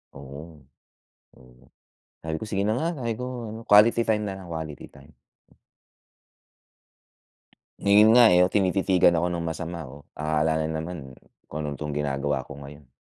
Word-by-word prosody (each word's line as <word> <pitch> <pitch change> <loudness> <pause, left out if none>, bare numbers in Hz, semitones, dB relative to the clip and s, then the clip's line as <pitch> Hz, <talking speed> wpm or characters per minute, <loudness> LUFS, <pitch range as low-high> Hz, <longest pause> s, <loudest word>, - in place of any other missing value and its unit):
Oo, 70 +2 -11 0.7
oo, 60 -1 -20 0.6
sabi 80 0 -4
ko 110 - -6
"Sige 100 -2 -2
na 110 +3 0
nga" 160 - -1
Sabi 115 -1 -1
ko 125 -2 -6
ano 110 +1 -8
"Quality 105 +3 +6
time 105 -1 +1
na 95 - -4
lang, 95 -2 -11
quality 80 -2 -6
time." 70 +3 -17 2.7
Ngayon 105 +2 +5
nga 120 - +8
eh, 90 - +5
yung 90 - +3
tinititigan 95 -2 +2
ako 85 +1 +1
ng 85 -1 -3
masama 85 0 -5
oh, 70 +2 -12 0.2
akala 80 +1 0
na 80 - -1 0.2
naman, 80 -6 -8 0.3
kung 75 +1 -6 0.2
tong 75 -1 -5
ginagawa 70 -1 -1
ko 70 - -11
ngayon. 70 -1 -12
80 Hz, 150 wpm, -25 LUFS, 75-100 Hz, 2.7 s, nga